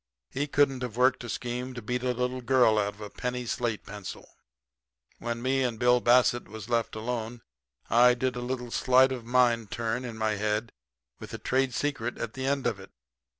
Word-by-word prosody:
He 140 +2 -2
couldn't 140 -2 +2
have 120 -2 -5
worked 125 0 +3
a 120 - -7
scheme 125 +2 -4
to 120 - -6
beat 125 +3 -2
a 125 0 0
little 125 +1 -2
girl 120 -3 +4
out 100 0 -1
of 105 - -16
a 105 - -6
penny 125 0 -3
slate 115 -2 -2
pencil. 100 -2 -8 0.9
"When 120 0 -4
me 135 +1 +1
and 125 -3 -1
Bill 125 +1 +4
Bassett 120 0 +4
was 110 0 -9
left 115 -2 0
alone 115 +1 -4 0.4
I 125 +1 +5
did 130 +1 -1
a 120 - -4
little 125 -1 -4
sleight 130 +2 +4
of 125 -3 -5
mind 120 -3 +2
turn 115 +3 -2
in 120 -3 -6
my 110 -1 0
head 105 +2 -1 0.5
with - - -8
a - - -4
trade 130 -1 0
secret 130 -5 -2
at 115 - -4
the 130 0 -3
end 140 -1 0
of - - 0
it. - - -12
120 Hz, 200 wpm, -28 LUFS, 115-125 Hz, 0.9 s, I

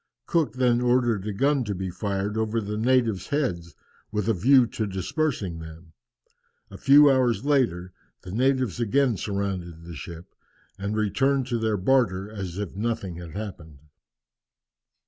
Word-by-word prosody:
Cook 160 -10 +1
then 125 -2 +2
ordered 120 -5 +1
a - - -1
gun 135 +6 +1
to 100 -2 -3
be 95 0 -4
fired 100 +2 -2
over 110 +1 0
the 105 -1 -4
natives' 115 -3 +1
heads 105 - -2 0.4
with 105 0 -2
a 115 - +3
view 125 +7 +5
to 110 -2 -3
dispersing 95 - -2
them. 80 0 -11 0.8
A 95 - -9
few 145 +3 +7
hours 130 -1 +1
later 105 -12 +1 0.3
the 90 - -8
natives 130 -1 +1
again 125 +2 +2
surrounded 95 -5 -4
the 85 0 -9
ship, 85 +2 -9 0.5
and 100 +2 -2
returned 135 +6 +1
to 120 -2 0
their 110 -2 0
barter 100 -3 +1
as 95 -4 -6
if 100 -3 -5
nothing 105 -5 -3
had 85 -2 -9
happened. 90 -8 -7
105 Hz, 150 wpm, -25 LUFS, 95-125 Hz, 0.8 s, few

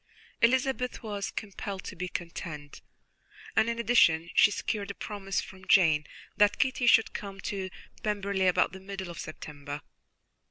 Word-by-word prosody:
Elizabeth 255 +1 +2
was 205 -2 -3
compelled 200 -2 -5
to - - -7
be 180 +1 -3
content, 165 -4 -6 0.7
and, 220 +1 +4
in 235 - -2
addition, 170 -9 +4
she 200 - +7
secured 205 0 -2
a 200 - -5
promise 195 -2 -3
from 190 0 -12
Jane 155 -5 +5 0.3
that 205 0 +4
Kitty 260 -2 +1
should 225 - +6
come 195 -1 -6
to 190 -2 -3 0.3
Pemberley 200 -2 0
about 180 - +3
the 190 - -9
middle 190 -2 -6
of 170 - -9
September. 145 -1 -7
195 Hz, 150 wpm, -29 LUFS, 175-210 Hz, 0.7 s, she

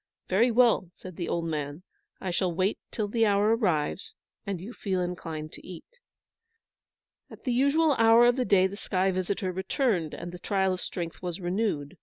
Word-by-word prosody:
"Very 220 +7 +4
well," 235 -6 +3
said 185 -2 -11
the 175 - -4
old 170 -1 -1
man. 150 0 -4 0.4
"I 185 - -3
shall 180 +1 0
wait 185 +4 0
till 215 -2 -2
the 225 +1 +2
hour 205 +2 +3
arrives, 215 - -1 0.3
and 195 -3 -2
you 205 +8 -8
feel 190 -5 -2
inclined 165 -3 -4
to - - -11
eat." 185 - -12 1.3
At - - -13
the 250 - 0
usual 285 +5 +3
hour 225 +1 +7
of 240 0 +4
the 255 - 0
day 195 -5 +4
the 190 +1 -2
sky 190 -2 0
visitor 185 +1 -2
returned, 190 - -1
and 175 - -7
the 180 - -9
trial 190 0 +1
of 185 - -5
strength 170 -2 -5
was 180 0 -4
renewed. 175 -5 -2
190 Hz, 185 wpm, -28 LUFS, 175-225 Hz, 1.3 s, hour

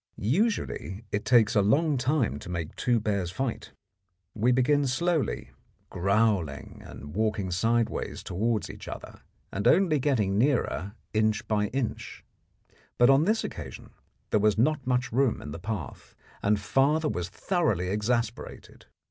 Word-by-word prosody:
Usually 120 - -1
it 105 - -2
takes 115 -4 +4
a 105 - +4
long 145 +10 +3
time 130 - 0
to - - -9
make 85 -3 -4
two 120 -2 +1
bears 100 -4 -1
fight. 120 +6 -4 0.6
We 115 +3 +2
begin 135 +3 +3
slowly, 165 +3 -1 0.4
growling 100 -4 0
and 75 +2 -10
walking 105 -3 0
sideways 115 +5 0
towards 110 +3 -1
each - - -11
other, - - -8 0.3
and 100 - -1
only 170 -5 +4
getting 110 -8 +1
nearer 115 -6 0 0.2
inch 110 0 +1
by 105 -1 +1
inch. 125 +1 -4 0.7
But 120 +2 +6
on 140 +4 +4
this 220 +3 +1
occasion 70 -7 -8 0.4
there 105 - +3
was 105 0 +2
not 140 +2 +1
much 125 0 0
room 130 0 +2
in 75 - -8
the 80 - -6
path, 95 - -6 0.3
and 105 +1 +2
father 145 +9 +2
was 90 - -3
thoroughly 105 - 0
exasperated. 115 +3 -3
110 Hz, 140 wpm, -27 LUFS, 100-135 Hz, 0.7 s, But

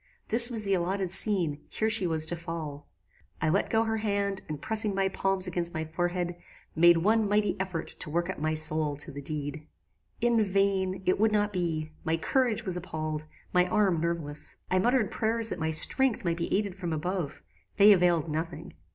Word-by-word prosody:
This 235 +2 +6
was 225 -3 +1
the 195 -1 0
allotted 185 +1 -1
scene: 180 -7 +2
here 220 - -1
she 215 -4 +3
was 160 -1 0
to 175 - -1
fall. 160 -4 -7 0.5
I 155 - 0
let 195 +6 +1
go 225 0 +2
her 220 0 -1
hand, 200 -2 -1
and 150 -2 -5
pressing 215 +2 +1
my 195 0 +1
palms 195 0 0
against 175 -2 -2
my 160 - -2
forehead, 175 +2 -3 0.4
made 170 +1 +6
one 215 +4 +2
mighty 210 0 +1
effort 185 -4 -3
to - - -2
work 170 +2 -1
up 190 - -5
my 155 +1 -1
soul 155 -1 +1
to 145 - -2
the 140 - -8
deed. 150 +1 -5 0.5
"In 235 -2 +2
vain; 195 -1 0
it 185 - +1
would 220 +1 +3
not 210 0 0
be; 160 -4 -2
my 160 +1 0
courage 240 +5 0
was 185 -3 0
appalled; 155 -3 -4 0.3
my 180 0 +3
arms 195 -5 +1
nerveless: 160 -3 -3 0.2
I 185 - +3
muttered 240 +1 +1
prayers 225 0 0
that - - -5
my 160 0 -1
strength 235 - +4
might 170 -1 0
be 170 - -3
aided 200 -1 0
from 175 -3 -5
above. 165 -1 -4 0.3
They 205 0 +8
availed 175 -3 +2
nothing. 160 +1 -5
180 Hz, 195 wpm, -28 LUFS, 160-205 Hz, 0.5 s, They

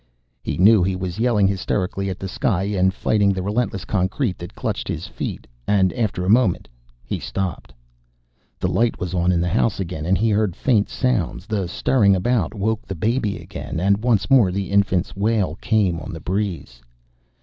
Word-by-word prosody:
He - - -3
knew 105 +2 +6
he 95 +1 +1
was 90 +1 -4
yelling 115 -5 +3
hysterically 95 0 -1
at 95 - -4
the 95 - -5
sky 95 0 0
and 95 -2 +1
fighting 100 +1 +1
the 95 -1 -3
relentless 105 -1 -1
concrete 95 +2 -1
that 85 - -9
clutched - - -3
his - - -4
feet, - - -5 0.2
and 95 -3 +3
after 105 -6 -1
a - - -2
moment 110 -3 +3 0.4
he - - -3
stopped. 95 -9 -4 0.9
The - - 0
light 115 0 +1
was 90 -1 -4
on 90 0 +2
in 85 - +2
the 90 - 0
house 100 +5 +1
again, 85 -4 -4
and 95 +1 +3
he 110 +1 +1
heard 105 -4 +1
faint 110 -6 +1
sounds. 115 -9 -1
The 100 -4 -2
stirring 100 +1 +3
about 105 +1 0
woke 110 +2 -1
the 95 - -6
baby 110 +3 0
again, - - -6
and 100 +4 +2
once 115 -5 +2
more 125 -9 +5
the 100 +1 -3
infant's 100 -3 +1
wail 100 -4 +1
came 100 -7 +1
on 80 +4 -7
the 80 - -6
breeze. 90 - -3
100 Hz, 185 wpm, -21 LUFS, 90-110 Hz, 0.9 s, knew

